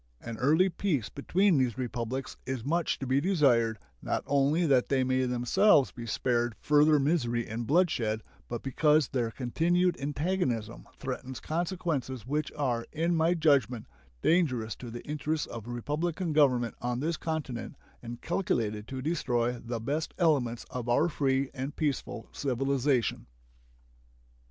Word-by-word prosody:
An 115 -1 -7
early 155 +8 +4
peace 170 - -1
between 180 +3 +2
these 125 -3 0
Republics 125 +1 -3
is 130 -3 -3
much 170 +3 0
to 135 - -5
be 130 +2 +2
desired, 130 - +3 0.2
not - - -2
only 145 +5 +2
that 135 -5 +3
they 135 -2 +2
may 130 0 +1
themselves 125 - +4
be 120 -2 -8
spared 120 0 0
further 150 +1 +4
misery 130 -6 0
and 115 +1 -4
bloodshed, 130 -10 +1 0.3
but 120 -1 -4
because 150 +2 +3
their 120 -4 0
continued 170 +9 +1
antagonism 140 - -2
threatens 130 -1 -5
consequences 160 - -2
which 150 +2 -1
are, 120 -5 -1
in 165 +2 0
my 165 +2 +3
judgment, 135 -8 +2 0.4
dangerous 130 -10 +2
to 120 - -9
the 120 +1 -8
interests 150 +1 -2
of 115 -1 -8
republican 155 +7 -2
government 125 -6 +3
on 120 0 -1
this 160 +4 -1
continent 155 -7 -4 0.3
and 120 0 -8
calculated 110 - -1
to 130 -1 -5
destroy 125 -7 0
the 115 0 -4
best 145 +8 -3
elements 135 -9 +1
of 125 -1 -4
our 145 +8 +3
free 135 -3 0
and 135 +1 -5
peaceful 140 -6 -2
civilization. 135 -1 0
135 Hz, 140 wpm, -29 LUFS, 120-155 Hz, 0.4 s, early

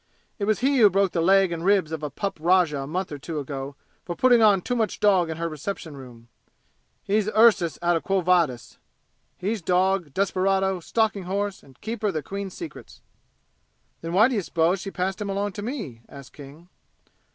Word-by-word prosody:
It 200 - -1
was 215 +1 0
he 270 +1 +2
who 210 -3 +7
broke 195 -1 +1
the 170 - -1
leg 190 +1 +4
and 165 -1 -4
ribs 190 -4 +2
of 160 -1 -4
a 150 - -3
pup 195 +6 -4
rajah 170 -4 +3
a 135 - -6
month 185 +4 -3
or 145 - -6
two 160 +3 -6
ago 140 -1 -5 0.3
for 175 - -5
putting 245 +3 +4
on 205 -3 +5
too 245 - -2
much 220 -4 -1
dog 190 -5 +3
in 160 - -4
her 170 0 -2
reception 160 0 -6
room! 120 -4 -13 0.8
He's 210 +1 0
Ursus 210 -8 +4
out 175 0 +3
of 165 - -1
Quo 195 -1 0
Vadis! 170 -9 0 0.6
He's 205 +3 -2
dog, 180 -2 +1
desperado, 190 +1 0
stalking 210 +1 -1
horse 200 +1 -3
and 135 -2 -20
Keeper 220 -1 -3
of 195 - -2
the 155 - -2
Queen's 195 +3 -6
secrets!" 335 -3 -10 1.0
"Then 165 +1 -5
why 210 +6 +6
d'you 240 -6 -1
suppose 170 +2 +1
she 195 - -5
passed 190 +1 -3
him 205 - -3
along 200 +1 -2
to 200 - -7
me?" 205 - -6
asked 140 -2 -12
King. 150 +4 -13
185 Hz, 195 wpm, -24 LUFS, 160-200 Hz, 1.0 s, who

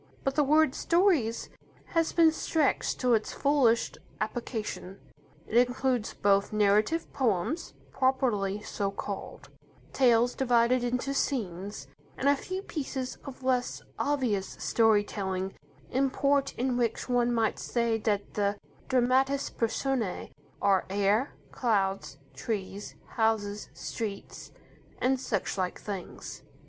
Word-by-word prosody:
But 270 - 0
the 295 +1 +3
word 305 0 +4
"stories" 335 - +2 0.4
has 330 -2 +1
been 330 -2 +5
stretched 315 -2 0
to 250 -1 +3
its 220 -1 +1
fullest 275 -5 +2 0.2
application. 215 -5 -4 0.5
It 240 +2 +4
includes 250 -2 -1
both 200 0 +2
narrative 215 +9 +2
poems, 250 - -1 0.2
properly 215 -7 +1
so 200 -2 -2
called; 200 0 -6 0.4
tales 245 -2 +4
divided 245 -1 +3
into 250 +3 -1
scenes; 205 -8 -2 0.3
and 275 - 0
a 285 - +6
few 370 +7 -5
pieces 265 -7 -4
of 270 -2 -9
less 255 -1 0 0.2
obvious 250 -9 0
story 220 -3 +3
telling 190 -2 -3 0.4
import 275 +1 +1
in 250 0 0
which 235 -2 -1
one 245 -1 +2
might 225 -2 +1
say 235 -2 0
that 205 -2 -1
the 205 0 0 0.3
dramatis 260 +2 +2
personae 230 - -1 0.3
are 195 -2 +3
air, 205 +6 +1 0.2
clouds, 195 -5 0 0.2
trees, 205 -2 -4
houses, 215 -2 -1
streets, 210 -3 -6 0.5
and 265 +1 +1
such 200 -6 -2
like 185 -1 -2
things. 195 -4 -7
235 Hz, 115 wpm, -29 LUFS, 205-265 Hz, 0.5 s, a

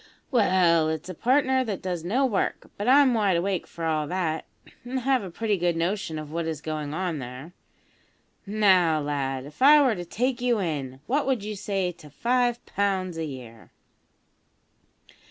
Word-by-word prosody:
"Well, 180 - +3
it's 160 +3 -4
a - - -4
partner 260 - +2
that 210 -6 -4
does 180 -3 -3
no 245 +10 +1
work; 215 -7 -2
but 205 - -4
I'm 270 0 +6
wide 205 -6 +2
awake 185 0 -1
for 165 - -6
all 155 -2 0
that, 170 -3 -2 0.4
an' 250 +2 -4
have 260 0 +1
a 190 - -6
pretty 210 +3 -1
good 175 -1 +1
notion 170 -1 -2
of 155 -1 -7
what 165 0 -2
is 160 -3 -3
going 155 -1 -4
on 170 -1 -2
there. 130 +6 -8 0.9
Now, 190 -6 +4
lad, 135 -3 -2
if 150 - -14
I 295 +3 +8
were 265 -5 +4
to 175 -4 -5
take 240 +8 -2
you 245 -3 +2
in, 140 -7 -3
what 280 +3 0
would 255 -6 0
you 210 0 -4
say 195 -2 -2
to 150 -3 -15
5 240 - 0
pounds 190 -3 -1
a 165 0 -3
year?" 125 -6 -10
185 Hz, 175 wpm, -26 LUFS, 155-230 Hz, 0.9 s, I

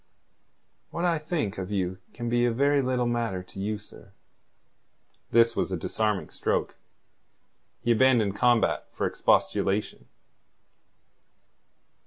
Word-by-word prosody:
"What 170 +1 -2
I 170 -2 +2
think 150 - -3
of 95 0 -5
you 95 -2 -2
can 120 - -6
be 120 +1 +2
a 120 - +3
very 140 +4 +2
little 125 -1 0
matter 115 -6 -1
to 95 - -12
you, 105 +2 -2
sir." 100 -1 -15 1.2
This 115 0 +4
was - - -1
a 95 - -1
disarming 105 +4 -1
stroke. - - -1 1.1
He 120 - +2
abandoned 115 -4 +3
combat 120 -2 +2
for - - -2
expostulation. 100 +10 0
115 Hz, 120 wpm, -27 LUFS, 100-125 Hz, 1.2 s, This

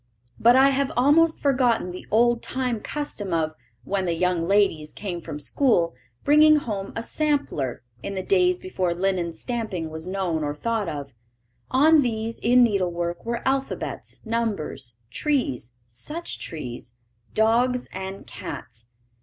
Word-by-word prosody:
But 240 +2 +6
I 265 +1 +7
have 275 0 0
almost 310 +5 +4
forgotten 250 -9 +2
the 180 - -9
old 240 +1 +3
time 250 -3 -2
custom 210 - -3
of, 155 -1 0 0.3
when 195 +5 -1
the 170 -1 0
young 175 -1 +1
ladies 195 -6 +2
came 180 -4 -5
from 150 - -6
school, 170 - +2 0.3
bringing 305 +1 +7
home 210 -9 -2
a 230 - -3
"sampler," 280 - -1 0.2
in 200 - -5
the 190 - -2
days 365 -2 +3
before 185 - -2
linen 180 -2 0
stamping 185 -3 -3
was 160 +2 -6
known 185 -5 -1
or 145 0 -2
thought 220 +2 -1
of. 140 -3 -6 0.6
On 300 +4 +6
these 225 -2 -2
in 245 +2 +5
needlework 175 -5 0
were 235 +2 -3
alphabets, 270 -2 -2
numbers, 200 - -2 0.2
trees 190 - -1
(such 300 - -6
trees), 125 -6 -6 0.4
dogs, 245 +3 +2
and 190 +1 -6
cats. 120 -5 -8
210 Hz, 140 wpm, -24 LUFS, 170-255 Hz, 0.6 s, I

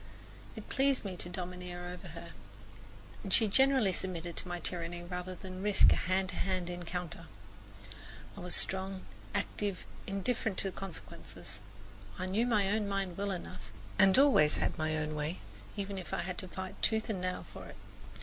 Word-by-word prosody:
It - - -8
pleased 270 -3 +2
me 190 -2 -3
to 175 - -2
domineer 180 0 -5
over 180 0 -7
her, - - -8 0.9
and 195 - -4
she 220 +3 +6
generally 265 -2 +5
submitted 175 -2 -2
to - - -2
my 175 0 -2
tyranny 175 0 -2
rather 180 +1 -4
than 185 +1 -7
risk 205 0 +7
a - - +1
hand 185 +1 +1
to 185 - -4
hand 185 -2 0
encounter. 175 -2 -4 1.1
I - - -8
was 180 0 -2
strong, 190 0 +1 0.3
active, 200 -3 -1 0.2
indifferent 195 +1 0
to 195 - +1
consequences. 190 -4 -7 0.6
I 185 - -2
knew 210 +6 +2
my 210 -5 +4
own 210 -1 +1
mind 195 -3 -1
well 200 +2 -1
enough 180 -1 -5 0.3
and 190 +1 +8
always 265 - +6
had - - +1
my 155 0 0
own 155 0 -1
way, 150 +3 -1 0.4
even 200 -1 -2
if 180 - -4
I - - -1
had 180 0 -3
to 185 - 0
fight 185 +1 -6
tooth 220 -1 +2
and 195 -5 -1
nail 180 0 -2
for - - -8
it. - - -10
185 Hz, 175 wpm, -33 LUFS, 175-200 Hz, 1.1 s, and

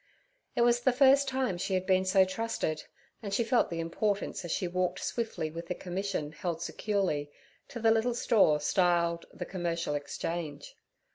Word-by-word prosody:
It - - +2
was 240 0 +4
the 260 +2 +3
first 275 +2 +5
time 260 -9 -1
she 190 +1 -1
had 185 0 -1
been 185 0 +3
so 190 0 +5
trusted, 190 -6 -2 0.4
and 205 -3 -5
she 235 - +2
felt 235 +2 +2
the 170 - -4
importance 195 +5 -1
as 175 - -6
she 180 - 0
walked 180 0 -1
swiftly 225 -9 -2
with 170 +1 -7
the 180 - -2
commission 180 -4 -3
held 165 +1 -3
securely, 180 -6 -1 0.4
to 240 - -7
the 225 0 +4
little 225 +2 +2
store 195 -11 +4
styled 170 +1 +1
the - - -6
'Commercial 170 -4 -2
Exchange.' 145 +1 -4
185 Hz, 170 wpm, -30 LUFS, 170-225 Hz, 0.4 s, first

